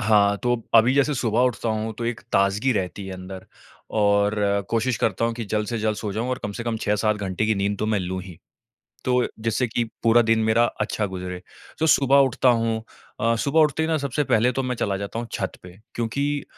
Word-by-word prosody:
हाँ, 105 -2 +4
तो 120 -2 0
अभी 115 +3 +6
जैसे 140 +1 +2
सुबह 120 -2 0
उठता 120 -2 -1
हूँ 110 0 -2
तो 120 - -3
एक 115 0 -2
ताज़गी 100 +6 +2
रहती 95 -1 -3
है 95 - -6
अंदर 95 +1 -9 0.5
और 100 0 +3 0.4
कोशिश 115 +1 +1
करता 110 +2 0
हूँ 115 0 0
कि 115 - -5
जल्द 105 +1 -1
से 120 -2 -2
जल्द 110 -1 0
सो 105 -2 -4
जाऊँ 115 +4 -2
और 130 - -2
कम 105 - -4
से 115 - -3
कम 115 -1 -1
6-7 105 +1 +1
घंटे 100 +1 -2
की 110 - +2
नींद 100 0 -1
तो 110 - -1
मैं 110 -1 +1
लूँ 95 +1 -3
ही, 90 -3 -11 0.7
तो, 125 -1 +2
जिससे 115 +3 0
कि 120 +1 -1 0.2
पूरा 115 +1 +5
दिन 115 0 +2
मेरा 110 +2 +3 0.2
अच्छा 105 0 -1
गुज़रे। 90 -2 -6 0.4
तो 160 - +2
सुबह 140 -1 +5
उठता 130 0 +2
हूँ 115 -1 -1 0.4
अ, 115 +1 +2
सुबह 140 +7 +1
उठते 155 0 +3
ही 160 - 0
ना 160 - +2
सबसे 140 0 -1
पहले 120 -2 +2
तो 135 +2 -2
मैं 125 -1 -2
चला 100 -4 -1
जाता 100 +3 -5
हूँ 120 - -5
छत - - -2
पे, 90 +1 -13 0.2
क्योंकि 140 +5 -1
110 Hz, 225 wpm, -23 LUFS, 100-125 Hz, 0.7 s, अभी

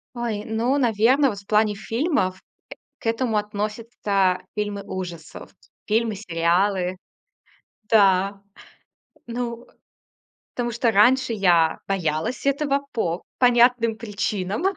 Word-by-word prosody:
Ой, 225 -3 -3
ну, 230 +5 0
наверно, 245 +3 +3
вот 200 - -7
в 200 - -22
плане 210 0 +2
фильмов, 215 - -1 0.6
к - - -13
этому 230 -1 0
относятся 210 -3 -1
фильмы 205 -1 -3
ужасов. 175 -5 -8 0.3
Фильмы, 220 -1 0
сериалы. 180 +1 0 0.9
Да. 195 -2 +3 0.9
Ну, 235 0 -5 0.9
тому 240 -1 -2
что 235 0 +1
раньше 245 +4 +4
я 175 -6 +3
боялась 180 - -2
этого 280 0 +1
по 175 -7 -1 0.2
понятным 240 -2 +4
причинам. 205 - -3
215 Hz, 100 wpm, -23 LUFS, 195-235 Hz, 0.9 s, раньше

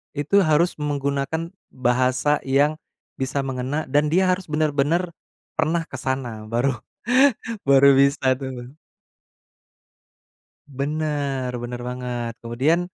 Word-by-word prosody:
itu 150 +8 +2
harus 155 +3 +3
menggunakan 145 +3 -2 0.2
bahasa 130 +3 +1
yang 145 +3 +3 0.4
bisa 135 +1 -1
mengena, 135 +3 -2
dan 145 +2 +3
dia 185 0 +4
harus 185 0 0
benar-benar 155 +3 0 0.5
pernah 165 +1 +1
ke 130 - -9
sana. 125 -4 -3
Baru 120 +5 0 0.9
baru 140 0 +6
bisa 135 -1 +3
tuh. 130 0 -7 1.9
Bener 140 -2 -2
bener 120 0 -5
banget. 125 -2 -4
Kemudian, 130 +9 +1
140 Hz, 100 wpm, -23 LUFS, 130-150 Hz, 1.9 s, baru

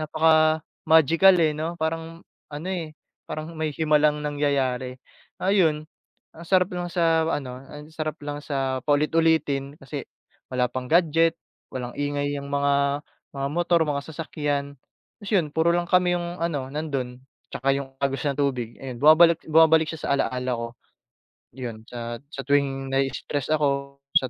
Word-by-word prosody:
napaka-magical, 160 +2 +4
eh 155 -1 +3
'no, 165 +2 -3
parang 165 +1 -3 0.3
ano, 160 +5 -5
eh, 165 -5 -4 0.3
parang 155 +1 -5
may 155 -2 -2
himalang 150 -1 +2
nangyayari. 135 -3 -1 0.4
Ayun 170 -6 +2 0.5
ang 170 - -10
sarap 185 0 +3
lang 175 0 -3
sa 165 -2 +2
ano, 130 -5 -3
ang 150 +2 -11
sarap 155 -2 -3
lang 145 0 -4
sa 135 -2 -1
paulit-ulitin 150 -2 +2
kasi 135 0 -6 0.5
wala 125 -1 +1
pang 125 0 -4
gadget, 165 +1 +3 0.4
walang 125 -1 -4
ingay 145 0 -1
ang 140 - -7
mga 140 0 +1 0.3
mga 140 0 -2
motor, 170 +1 +2
mga 140 -1 -1
sasakyan. 145 -3 -3 0.4
Tapos 205 0 -7
'yon 170 -5 +3
puro 160 +1 +3
lang 175 0 -1
kami 180 -1 +4
yung 175 +1 -5
ano 145 -6 -2
nandun, 135 -4 -4 0.3
'tsaka 135 +2 +1
yung 135 -1 -6
agos 135 -1 -1
ng 140 -1 -1
tubig 125 -5 -1
ayan 130 -3 -7
bumabalik 165 +2 +7
bumabalik 160 0 +5
siya 160 - -7
sa - - -1
ala-ala 125 -2 -1
ko. 115 - -4 0.9
Yun 115 -4 -6
sa 120 -1 -5 0.2
sa 140 - -5
tuwing 135 -1 +1
nai-stress 135 +1 -1
ako, 140 -2 -1 0.2
sa 130 - +4
150 Hz, 150 wpm, -25 LUFS, 135-160 Hz, 0.9 s, bumabalik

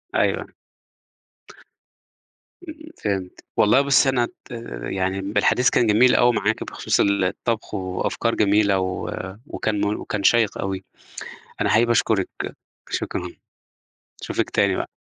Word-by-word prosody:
أيوه. - - 0 2.2
إمم، 315 +1 -11
فهمت، 95 -3 -3
والله 110 +6 +5
بُصّي 140 -1 +4
أنا 125 -2 +2
ت 130 - -17
آآ - - -6
يعني 95 0 -1
م 100 +2 -5
الحديث 125 0 +4
كان 120 - +2
جميل 120 +4 +5
أوي 120 0 +4
معاكِ 110 +1 0
بخصوص - - -1
الطبخ، 100 +3 0
وأفكار 95 +4 -2
جميلة 100 -1 +3
و 95 0 -3 0.4
وكان 105 -2 -2
مور 105 +1 0
وكان 105 -2 -4
شيّق 115 -2 +3
أوي، 95 -1 -3 0.8
أنا - - +2
حقيقي 115 +2 +4
باشكرِك، 110 -4 +2 0.6
شكرًا، - - -3 0.9
اشوفِك - - -2
تاني - - +2
بقى. - - -3
105 Hz, 130 wpm, -22 LUFS, 95-120 Hz, 2.2 s, والله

